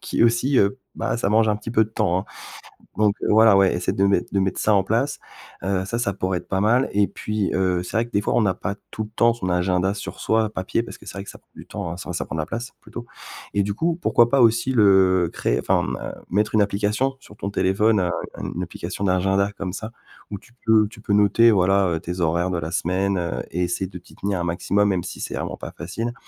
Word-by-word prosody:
qui - - +1
aussi, 120 +4 +2
heu 100 +6 +2 0.2
bah, - - -1
ça 115 - 0
mange 110 +1 +3
un 105 - +2
petit 105 +2 -7
peu 110 -1 +3
de - - -12
temps, 100 -5 +1
hein. 95 - -9 0.7
Donc 105 -1 +3
voilà, 110 0 +6
ouais, 95 -2 +4
essaie 90 0 -1
de 95 - +1
mettre 100 -2 +1
de 100 - +2
mettre 95 -1 -1
ça 110 - +2
en 100 - +4
place, 120 +8 0 0.5
heu 95 -1 0
ça, 115 +5 -3
ça 120 -4 0
pourrait 95 -1 -1
être - - -15
pas 95 - 0
mal 120 +6 +3
et 100 0 +3
puis 105 -2 -2
heu, 90 -2 +1
c'est 90 - -5
vrai 115 +1 +1
que - - -18
des 100 - +2
fois - - -1
on 120 - +3
n'a 100 -3 +2
pas 100 - -4 0.2
tout 110 - -4
le 105 - -11
temps 115 0 +4
son 95 -6 -4
agenda 90 +2 +1
sur 100 - -7
soi 110 0 +1
papier, 95 +2 -2
parce - - -9
que - - -16
c'est - - -8
vrai 100 - -5
que - - -9
ça - - -13
prend - - -41
du - - -12
temps, - - -5
hein, - - -6
ça 90 -1 -6
ça - - -2
prend - - -6
de - - -1
la 75 - -3
place, 120 +5 -5
plutôt. 120 0 -9 0.5
Et 100 - +3
du 100 0 -2
coup, 165 +6 0
pourquoi 120 -8 +4
pas 140 - +3
aussi 120 +2 +3
le 95 -6 +4
créer, - - 0
enfin, - - +1
mmh - - -3
heu, - - -5 0.2
mettre 105 +4 0
une 110 - +5
application 105 +7 0
sur 105 - -16
ton 100 - -4
téléphone 100 +3 +2
un 90 -1 0 0.4
une - - -3
application 100 - -5
d'agenda 95 +1 +2
comme 95 -2 -4
ça, 110 +2 -6 0.4
où 100 - -4
tu 120 - -22
peux 110 -2 +4
tu 110 - -14
peux 105 - -2
noter 105 +3 +5
voilà, 95 -1 +3
heu, 80 -1 -1
tes 90 +2 -5
horaires 85 +2 +1
de 90 - -1
la 80 -1 -4
semaine, 95 +3 0
heu, 85 -1 -2
et 90 - -2
essayer 90 +2 -2
de 90 - -8
t'y 85 - -19
tenir 100 -2 -2
un - - -1
maximum, 95 +4 +1
même 95 -3 0
si 90 - -7
c'est - - -5
vraiment - - -4
pas - - -7
facile. 115 +8 -4
100 Hz, 265 wpm, -23 LUFS, 95-110 Hz, 0.7 s, voilà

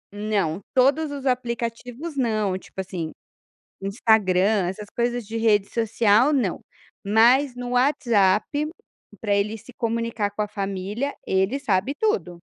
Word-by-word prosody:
Não, 205 -5 -1
todos 280 +5 +3
os 280 -1 -6
aplicativos 245 +4 -3
não, 215 -7 0
tipo 190 - -9
assim, 175 -4 -4 0.7
Instagram 195 -1 +2
essas 205 +3 -6
coisas 240 0 -1
de 225 +2 -6
rede 210 -3 +3
social 225 +3 +3
não, 235 -11 0 0.5
mas 245 +6 +4
no 245 0 -6
WhatsApp 235 -7 +3 0.8
pra 205 -2 +1
ele 210 +2 0
se 240 +4 -14
comunicar 230 -3 -2
com 210 - -2
a 210 - -3
família, 200 +7 -3
ele 190 +9 0
sabe 215 +1 0
tudo. 180 - -1
220 Hz, 130 wpm, -24 LUFS, 200-245 Hz, 0.8 s, mas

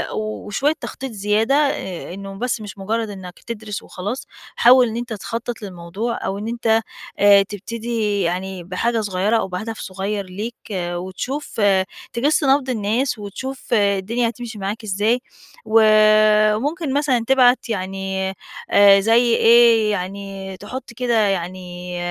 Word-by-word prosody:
وشوية 215 +6 -1
تخطيط 265 -1 -6
زيادة 215 +5 +1
آآ 190 - -1
إنّه 195 +1 -8
بس 235 -2 -1
مش 205 0 -9
مُجرّد 220 +3 -2
إنّك 190 -3 -9
تدرس 215 -3 -6
وخلاص. 205 +8 -5 0.3
حاول 250 0 +6
إن 225 +1 -4
أنت 240 -1 -4
تخطّط 230 +3 -5
للموضوع، 195 +5 -4
أو 195 - -2
إن 210 +2 -5
أنت 225 -1 +1 0.4
آآ 200 0 +7
تبتدي 215 +1 -3
يعني 185 +1 -2
بحاجة 220 +6 -1
صغيّرة 205 +2 +1
أو - - -1
بهدف 215 +5 -5
صغيّر 195 +2 -4
ليك 210 +6 -6 0.2
وتشوف 185 +9 -4 0.5
تِجِس 290 +6 +1
نَبْض 270 0 +3
الناس 230 +2 -1
وتشوف 255 +6 -6
الدنيا 210 +3 +1
هتمشي 235 -2 -8
معاك 205 +4 -4
إزاي، 215 +4 +1 0.5
وممكن 215 +6 +4
مثلًا 270 -5 +1
تبعت 255 -2 +4
يعني 190 -1 -3 0.4
آآ 200 -1 +7
زي 230 +3 +3
إيه، 230 -2 +5
يعني 195 0 -5
تحُط 245 +4 -8
كده 240 0 -1
يعني 180 -1 -4
215 Hz, 130 wpm, -20 LUFS, 195-235 Hz, 0.5 s, آآ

